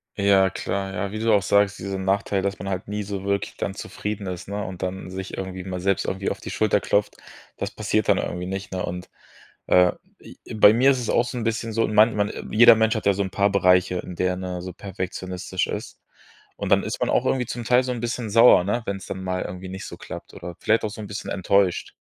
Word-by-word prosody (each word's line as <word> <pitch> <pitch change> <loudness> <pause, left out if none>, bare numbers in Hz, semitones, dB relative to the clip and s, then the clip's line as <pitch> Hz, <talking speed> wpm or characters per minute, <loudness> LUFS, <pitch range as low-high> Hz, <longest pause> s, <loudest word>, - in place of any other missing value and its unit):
Ja, 100 -1 +4
klar. 95 +2 -3
Ja, 100 +1 -3
wie 110 - -5
du 115 0 +2
auch 100 -3 +3
sagst, 100 0 +3
diesen 95 0 -4
Nachteil, 100 0 0
dass 100 +1 -2
man 100 +2 -6
halt 95 0 -3
nie 105 0 -3
so 100 -1 -5
wirklich 100 0 -1
dann - - -3
zufrieden 105 -1 -5
ist, 90 0 -6
ne, 100 0 -3
und 90 -1 -7
dann 95 0 -4
sich 95 +1 -6
irgendwie 95 -1 -5
mal 90 -1 -5
selbst 95 +1 0
irgendwie 95 +1 -2
auf - - -5
die - - -8
Schulter - - +2
klopft, - - 0 0.4
das - - -3
passiert - - -1
dann - - +5
irgendwie 90 +1 -3
nicht, 95 +2 -5
ne? 95 -1 -3
Und, 90 +1 -5 0.6
äh, 90 -1 +5 0.3
i - - -13 0.2
bei 105 0 +7
mir 130 +4 +5
ist 130 - 0
es 120 - -4
auch 120 - +3
so 125 0 -5
'n 115 - -3
bisschen 115 0 -2
so, 115 0 +1
man 110 +1 +4
man 105 0 0 0.2
jeder 115 +1 +8
Mensch 110 +1 +2
hat 110 - -3
ja 100 - +5
so 100 - -2
'n 95 - -4
paar 100 0 +2
Bereiche, 90 -2 +3
in 90 - -7
der 90 +1 +1
er, - - -2
ne, 90 -1 -5
so 90 -1 -7
perfektionistisch 95 -1 -4
ist. - - -6 0.6
Und - - -4
dann - - +5
ist - - -4
man - - +1
auch - - +2
irgendwie 125 -3 +1
zum 120 0 -5
Teil 125 +2 +4
so 125 - -2
'n 120 - -4
bisschen 120 -1 -3
sauer, 115 -4 +7
ne, 115 +5 -1
wenn's 95 -1 -4
dann 95 - -6
mal 90 0 -2
irgendwie 90 +1 -7
nicht 95 +1 -7
so - - -8
klappt - - -9
oder 90 -1 -8
vielleicht 110 +1 +2
auch 105 - -1
so 110 - -9
'n 105 - -6
bisschen 105 +1 -6
enttäuscht. 95 -1 +1
100 Hz, 250 wpm, -24 LUFS, 95-110 Hz, 0.6 s, jeder